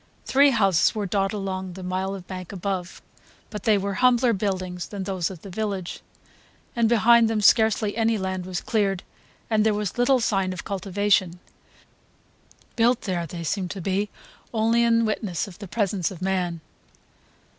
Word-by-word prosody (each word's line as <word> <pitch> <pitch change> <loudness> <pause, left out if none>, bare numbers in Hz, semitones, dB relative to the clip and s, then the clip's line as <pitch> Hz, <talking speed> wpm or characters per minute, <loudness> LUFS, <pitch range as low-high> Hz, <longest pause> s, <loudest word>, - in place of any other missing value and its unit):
Three 280 +2 +5
houses 195 - +3
were 210 -2 -2
dotted 195 +1 0
along 190 -2 -4
the 190 +1 -9
mile 190 +2 -2
of 185 -2 -9
bank 185 -2 -7
above; 185 -1 -4 0.5
but 210 -3 -7
they 215 -2 +4
were 200 0 -2
humbler 250 -1 +4
buildings 185 -3 -3
than 200 -2 -5
those 185 -3 -2
of 180 -5 -10
the 195 - -9
village, 195 -3 -4 0.7
and 230 -2 +2
behind 235 0 +5
them 225 -1 0
scarcely 215 0 +3
any 225 0 +2
land 190 -2 -3
was 180 -1 -3
cleared 195 -4 0 0.4
and 215 -2 +2
there 215 -1 +2
was 210 +2 -3
little 255 +2 +4
sign 195 -5 0
of 180 - -7
cultivation: 195 -2 0 1.4
built 240 +1 +3
there, 175 -4 -2
they 170 +2 -7
seemed 185 +2 -2
to 195 - -6
be, 195 +3 -1 0.4
only 230 +1 +2
in 230 -1 +3
witness 210 -6 -2
of 190 -1 -12
the 200 - -8
presence 195 -3 -1
of 185 - -9
man. 180 -3 -1
195 Hz, 165 wpm, -24 LUFS, 185-220 Hz, 1.4 s, Three